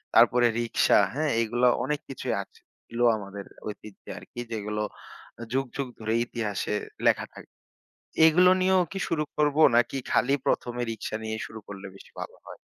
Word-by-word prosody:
তারপরে 120 0 +6
রিক্সা, 115 -2 +3
হ্যাঁ? 155 +1 0
এইগুলা 120 +2 +2 0.2
অনেক 150 +2 -1
কিছুই 135 - -2
আছে - - -24 0.3
এগুলো 120 +1 +2
আমাদের 100 -1 -8 0.2
ঐতিহ্য 105 -1 -9
আরকি, 120 - -10
যেগুলো 105 -1 -3 0.6
আ - - -6
যুগ, 135 +1 +1
যুগ 140 -2 -2
ধরে 110 0 -2
ইতিহাসে 105 -3 -3 0.3
লেখা - - +4
থাক - - -11 0.8
এইগুলো 180 +3 +6
নিয়েও 185 0 +4
কি 195 - -4
শুরু 155 -2 0
করবো? 150 0 +2
নাকি 120 +3 +2
খালি 135 +2 +3
১ম 120 - 0
এ - - +1
রিক্সা 110 0 -5
নিয়ে 110 0 -3
শুরু 110 - -9
করলে 100 -1 -8
বেশি - - -15
ভালো - - -7
হয়? - - -10
120 Hz, 165 wpm, -27 LUFS, 110-145 Hz, 0.8 s, তারপরে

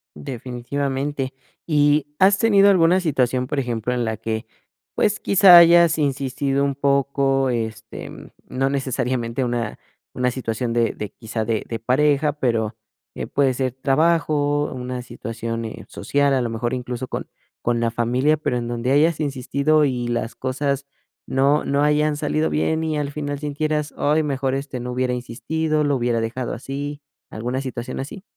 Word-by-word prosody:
Definitivamente. 130 - -3 0.3
Y, 145 -2 +3
¿has 195 +1 +5
tenido 200 -2 +5
alguna 180 -1 +4
situación?, 130 -7 0
por 145 - -1
ejemplo, 120 -2 -2
en 120 -1 -1
la 110 -1 -2
que, 110 +1 -3 0.5
pues, 210 0 +1
quizá, 190 -2 +7
hayas 170 -1 +7
insistido 140 -1 0
un 140 -1 0
poco, 140 -1 +1
este, 110 -2 -4 0.4
no 135 +1 0
necesariamente 130 -2 -1
una 120 -3 -2 0.4
una 125 0 +1
situación 120 -1 -3
de 115 -1 +1
de 105 - -6
quizá, 110 +1 -5
de 110 -1 -1
de 115 -2 -4
pareja, 145 +4 +2
pero, 115 -6 -1 0.4
eh, - - -4
puede 135 -3 +1
ser 130 -1 -1
trabajo, 145 +1 +1
una 125 0 -5
situación, 115 -1 -5
eh, 110 - -8
social, 140 -1 +1
a 130 - +1
lo 120 - -1
mejor, 120 +2 -2
incluso 125 0 -5
con - - -5 0.4
con 120 0 +1
la 115 - +1
familia, 125 +6 +1
pero 135 -4 -1
en 120 -1 -3
donde 120 +2 -2
hayas 155 +3 +3
insistido 140 +1 +1
y 125 -3 -1
las 120 -1 -2
cosas 140 +1 -2 0.4
no 140 +3 +2
no 140 +1 +1
hayan 150 0 +2
salido 75 - 0
bien 80 - 0
y, 155 -1 -1
al 145 -1 -2
final, 145 -1 -4
sintieras: 150 +1 -2
"Ay, 150 +2 +2
mejor, 135 -3 -1
este, 135 -2 -4
no 125 +1 -5
hubiera 125 0 0
insistido, 155 +6 -1
lo 145 -1 +1
hubiera 120 -2 0
dejado 115 +2 -3
así", 145 +3 -5 0.3
¿alguna 125 +4 -3
situación 125 -3 -5
así? 150 +8 -6
135 Hz, 160 wpm, -22 LUFS, 120-145 Hz, 0.5 s, quizá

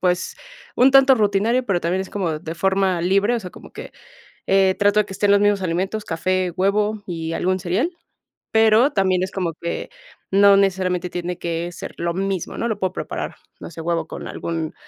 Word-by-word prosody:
pues, 180 0 0 0.4
un 260 +2 +5
tanto 270 0 +7
rutinario, 215 +4 +1
pero 180 -4 +1
también 175 +3 -1
es 190 - -6
como 170 -6 -2
de 160 0 -7
forma 190 0 +1
libre, 200 +6 +2
o 235 - -1
sea, 180 - -8
como - - -14
que, - - -9 0.6
eh, 190 -1 +4
trato 205 +1 +3
de 210 - -1
que - - -9
estén 205 +1 +1
los 200 0 +5
mismos 205 -2 +2
alimentos, 190 +5 -2
café, 185 +2 -1
huevo 205 +2 +1
y 165 -2 -4
algún 185 +1 0
cereal, 190 - 0 0.6
pero 225 +5 +4
también 185 -2 +1
es 190 - -2
como 175 -4 -2
que 170 - -4 0.4
no 200 0 +6
necesariamente 185 -2 0
tiene 175 0 -4
que 170 0 -3
ser - - -8
lo 170 0 -2
mismo, 195 -2 -3
¿no?, 235 - -1
lo 220 -3 -3
puedo 185 -1 -1
preparar, - - -5 0.2
no - - -8
sé, 165 - -11
huevo 165 -1 -1
con - - -7
algún 165 -2 -4
190 Hz, 200 wpm, -21 LUFS, 175-205 Hz, 0.6 s, tanto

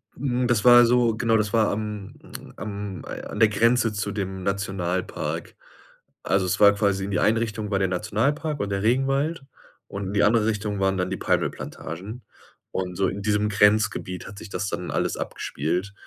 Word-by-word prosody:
Mhm, 125 -2 -1
das 115 -4 +2
war 120 -1 +9
so 120 -1 +3
genau, 115 0 +2
das 105 0 -1
war 110 -2 +3
am 105 -1 -5 0.4
am 100 -2 -6
an - - -7
der 110 - +6
Grenze 115 +2 +3
zu 100 0 -3
dem 95 -2 -4
Nationalpark. 95 -2 -3 0.7
Also, 95 -1 +1
es 90 - -1
war 100 -1 +7
quasi, 100 -2 0
in 100 - -5
die 85 - +1
Einrichtung 110 -1 0
war 95 - +1
der 95 - +2
Nationalpark 125 - -1
und 100 - -2
der 100 +1 -1
Regenwald 135 +5 +1 0.4
und 100 -1 -5
in 100 - -4
die 100 - +3
andere 110 0 +4
Richtung 105 -2 -2
waren 95 0 +1
dann 90 - -1
die - - -3
Palmölplantagen. 100 - -3 0.5
Und 90 -1 -3
so 95 -1 +2
in 100 +2 -4
diesem 105 0 +1
Grenzgebiet 105 -3 +2
hat 100 - -10
sich 105 - -10
das 100 +1 -3
dann 90 - -4
alles - - 0
abgespielt, 90 +7 -3
105 Hz, 180 wpm, -24 LUFS, 95-115 Hz, 0.7 s, war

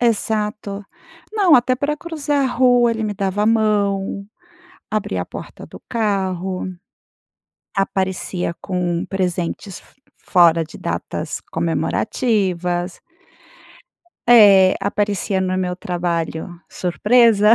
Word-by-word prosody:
Exato, 210 -3 -1 0.5
não 390 -7 +4
até 255 +1 +4
pra 290 +3 -2
cruzar 295 -4 -1
a - - +2
rua, 245 -1 +4
ele 225 -1 -2
me 205 -1 -2
dava 195 +1 -1
a - - +2
mão, 200 -3 +1 0.6
abria 195 - -1
a - - -6
porta - - -9
do - - -13
carro, 190 -5 -1 1.1
aparecia 190 -2 -1
com 180 -1 -2
presentes 180 0 -3
f - - -21 0.3
fora 170 -3 +4
de 155 - -12
datas - - -4
comemorativas. 180 -6 -1 1.3
Eh, 200 -5 +7
aparecia 200 -1 -1
no 185 0 -1
meu 180 -1 -2
trabalho." 170 -1 -3
Surpresa!" 215 +3 +4
200 Hz, 105 wpm, -20 LUFS, 180-225 Hz, 1.3 s, Eh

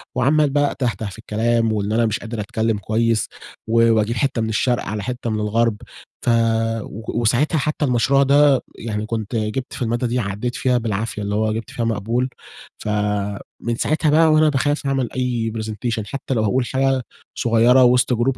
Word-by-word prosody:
وعَمال 145 +4 +3
بقى 145 +1 +1
أتهته 120 -4 -2
في 100 - -12
الكلام 115 +1 0
وإن 105 -1 -1
أنا 115 0 +3
مش 110 -1 -1
قادر 115 -1 -6
أتكلم 110 0 -1
كويس، 110 +2 0 0.4
و 115 0 +4
وأجيب 110 +1 +1
حتة 130 0 0
من 110 - -1
الشرق 120 +3 0
على 105 -1 -4
حتة 125 -2 -4
من 110 -1 -1
الغرب، 110 +1 +1 0.5
ف - - +2 0.5
و 115 +2 -5
وساعتها 125 +8 +2
حتى 150 +1 0
المشروع 135 +2 +3
ده 140 -1 +4
يعني 110 -2 -4
كنت 110 0 -4
جبت 110 +4 -2
في - - -8
المادة 120 +1 0
دي 120 +2 -1
عدّيت 105 +3 -3
فيها 125 -1 +1
بالعافية، 110 -1 -3
اللي 100 0 -2
هو 110 0 +1
جبت 115 +2 -5
فيها 120 -4 -2
مقبول، 115 +4 -1 0.5
فمن 105 +2 -2
ساعتها 155 0 +1
بقى 160 +1 +5
وأنا 155 0 +5
باخاف 145 +1 0
أعمل 135 -3 0
أي 120 -3 -1
presentation، 110 0 -3
حتى 135 +2 -4
لو 110 -3 +1
هاقول 125 +4 +1
حاجة 135 0 +1 0.4
صغيرة 120 +2 +4
وسط 125 0 +4
جروب 125 +3 0
115 Hz, 180 wpm, -20 LUFS, 110-130 Hz, 0.5 s, بقى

